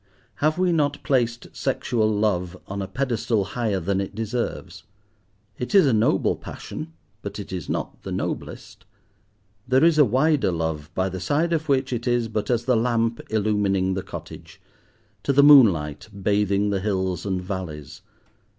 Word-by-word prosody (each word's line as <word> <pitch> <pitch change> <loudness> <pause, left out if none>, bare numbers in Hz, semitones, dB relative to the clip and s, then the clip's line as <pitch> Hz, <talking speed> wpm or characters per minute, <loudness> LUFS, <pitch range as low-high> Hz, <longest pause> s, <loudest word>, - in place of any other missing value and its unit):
Have 155 +2 +1
we 180 -1 +2
not 145 -3 0
placed 120 -3 -1
sexual 110 -3 0
love 100 -4 0
on 100 +1 -5
a 95 - -4
pedestal 120 -3 -1
higher 105 -1 -2
than 95 +3 -1
it 100 - -6
deserves? 115 +2 -4 0.8
It 125 - -3
is 195 - +7
a 135 - +3
noble 110 0 +2
passion, 160 +1 -8 0.3
but 100 0 -6
it 100 -2 -7
is 90 -4 -5
not - - -4
the - - -7
noblest. - - -5 0.8
There 130 +3 +3
is 165 -2 +4
a - - +9
wider 135 - +2
love 80 -3 -3
by 95 0 +1
the 95 0 -5
side 155 - 0
of 160 -1 -2
which 130 -1 +1
it 120 +1 -3
is 120 -2 +1
but 105 -1 -3
as 120 -1 +1
the 125 - +3
lamp 115 0 0
illumining 100 -3 +1
the 95 - -2
cottage, - - -10 0.6
to - - 0
the 140 +1 +5
moonlight 105 - +5
bathing 100 0 +1
the 100 - 0
hills 95 -3 -1
and 95 -2 -1
valleys. 90 -4 -6
110 Hz, 165 wpm, -24 LUFS, 95-130 Hz, 0.8 s, a